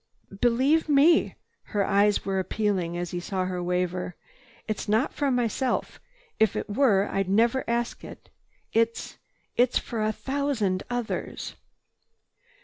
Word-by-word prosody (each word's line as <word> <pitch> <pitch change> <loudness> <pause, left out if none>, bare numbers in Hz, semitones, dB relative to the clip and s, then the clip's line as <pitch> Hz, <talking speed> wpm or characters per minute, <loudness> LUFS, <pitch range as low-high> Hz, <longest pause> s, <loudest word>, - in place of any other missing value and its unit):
"Be 195 - -11
believe 260 +8 +2
me!" 300 +4 +4 0.3
His - - -14
eyes 200 0 +3
were 195 -1 0
appealing 185 -3 -1
as 175 0 -3
he 175 - -3
saw 185 +1 -2
her 180 -1 -3
waver. 180 0 -1 0.5
"It's 215 -1 -3
not 220 +7 +2
for 285 -2 0
myself. 245 0 -1 0.4
If 220 -2 +3
it - - -3
were, 205 -3 +3
I'd 195 -1 -1
never 235 +6 +3
ask 235 0 -2
it. - - -12 0.4
It—it's 230 +1 -1
for 230 -2 -3
a 215 - +1
thousand 255 -7 -1
others." 245 -2 -4
215 Hz, 135 wpm, -26 LUFS, 190-245 Hz, 0.5 s, me